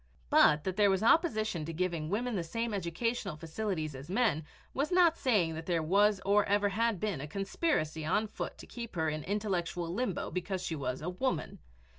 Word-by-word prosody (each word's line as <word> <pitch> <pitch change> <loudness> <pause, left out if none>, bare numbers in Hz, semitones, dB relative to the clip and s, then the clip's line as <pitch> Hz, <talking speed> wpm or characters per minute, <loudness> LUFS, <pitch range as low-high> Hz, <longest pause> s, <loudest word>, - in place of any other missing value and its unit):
But 150 - +6
that 190 +2 -3
there 205 -1 +5
was 190 +1 +1
opposition 220 - +2
to 165 +2 -5
giving 170 -2 -2
women 235 +4 -1
the 180 - -1
same 230 +7 -3
educational 200 +2 -2
facilities 160 -1 -3
as 135 +4 -9
men 195 -7 +1 0.3
was 285 +5 -1
not 350 -2 +5
saying 205 - +2
that 160 0 -7
there 170 -3 +1
was 200 +4 +3
or 205 +1 +4
ever 205 0 +2
had 225 0 0
been 200 -9 -2
a 150 - -5
conspiracy 195 - -1
on 210 +8 +1
foot 215 - -6
to - - -11
keep 235 -4 -8
her 160 -2 +1
in 155 0 -3
intellectual 180 -4 -2
limbo 210 -3 -2
because 185 0 -3
she 165 - -2
was 130 -1 -3
a 175 - -2
woman. 250 +9 -2
190 Hz, 195 wpm, -31 LUFS, 165-220 Hz, 0.3 s, But